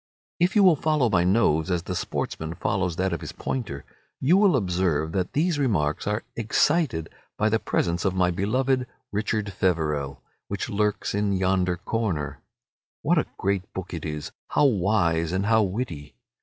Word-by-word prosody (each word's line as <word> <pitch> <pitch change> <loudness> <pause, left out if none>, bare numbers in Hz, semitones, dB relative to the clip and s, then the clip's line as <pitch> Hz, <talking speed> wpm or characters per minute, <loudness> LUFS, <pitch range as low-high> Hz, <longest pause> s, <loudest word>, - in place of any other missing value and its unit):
If 175 +4 +2
you 205 - +6
will 180 -4 +7
follow 150 -5 +1
my 85 - +3
nose 90 -4 +2
as 90 -2 0
the 90 0 -4
sportsman 80 -1 -3
follows 95 -4 -1
that 95 +1 0
of 85 - -3
his - - -7
pointer, 95 - -4 0.3
you 150 +8 +4
will 195 -5 +5
observe 90 - 0
that 90 +1 -2
these 160 +1 +1
remarks 85 - 0
are 105 +2 -1
excited 115 - +1 0.3
by 110 - +2
the 110 +1 +2
presence 85 -4 0
of 95 -2 0
my 90 -1 +3
beloved 125 +8 0 0.2
"Richard 105 -1 -1
Feverel," 75 -7 -1 0.2
which - - -4
lurks 105 0 0
in 100 0 +1
yonder 95 -1 +1
corner. 90 -8 -2 0.6
What - - +3
a - - -1
great 100 -1 -1
book 95 -1 -5
it 80 - -5
is, 75 -1 -5 0.2
how 150 - +3
wise 90 - +2
and 95 +2 0
how 110 +1 +4
witty! 90 - -3
95 Hz, 170 wpm, -25 LUFS, 85-115 Hz, 0.6 s, will